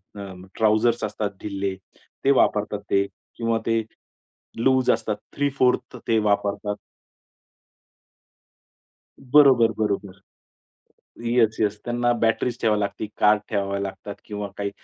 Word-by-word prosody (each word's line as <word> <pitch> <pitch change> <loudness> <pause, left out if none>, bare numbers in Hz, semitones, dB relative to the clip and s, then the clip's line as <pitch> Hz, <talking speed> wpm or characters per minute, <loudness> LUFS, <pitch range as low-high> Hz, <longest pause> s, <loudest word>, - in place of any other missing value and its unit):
अ, 100 -1 -7 0.3
trousers 110 +1 +2
असतात 105 0 -2
ढिल्ले 100 -2 -3 0.5
ते 140 - +6
वापरतात 105 0 +1
ते 100 0 +3 0.3
किंवा 115 -1 0
ते 115 0 +2 0.8
लूज 130 +1 +3
असतात 105 - -1 0.2
3/4 135 -3 +1
ते 115 - +3
वापरतात. 105 0 0 2.4
बरोबर, 130 -4 +5
बरोबर. 100 -2 -2 1.1
येस, 115 -2 +2
येस, 105 -1 +1
त्यांना 120 0 +1
बॅटरीज 115 +2 +1
ठेवावी 105 -2 +2
लागती, 100 +1 -3
कार्ड 105 0 +4
ठेवावे 100 -1 -1
लागतात 100 +1 -6
किंवा 105 -1 -5
काही 100 0 -2
105 Hz, 110 wpm, -24 LUFS, 100-120 Hz, 2.4 s, ते